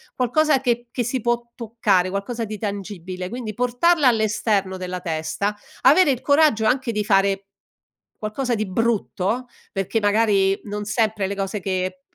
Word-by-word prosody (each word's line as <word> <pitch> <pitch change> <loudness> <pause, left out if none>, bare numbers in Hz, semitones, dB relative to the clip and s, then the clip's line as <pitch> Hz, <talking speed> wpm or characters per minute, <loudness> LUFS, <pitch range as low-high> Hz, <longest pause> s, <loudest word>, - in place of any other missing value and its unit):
qualcosa 270 +3 +2
che 240 -2 0
che 245 - -1
si 245 +3 -1
può 240 0 -1
toccare, 215 -6 +1
qualcosa 210 +5 -3
di 215 0 -6
tangibile. 190 -3 -5
Quindi, 225 +1 -5
portarla 250 - +2
all'esterno 215 -4 +1
della 180 0 -5
testa, 170 +6 -2 0.2
avere 290 +3 +6
il 250 - -2
coraggio 285 -6 +3
anche 250 +2 +1
di 210 0 0
fare 195 -1 +2 0.7
qualcosa 240 +4 -2
di 215 0 -1
brutto, 230 +2 -1 0.3
perché, 195 +3 -1
magari, 205 -2 +3
non 210 0 -4
sempre 215 -2 0
le 200 - -3
cose 195 +1 -3
che 185 +6 -2
215 Hz, 150 wpm, -22 LUFS, 195-240 Hz, 0.7 s, avere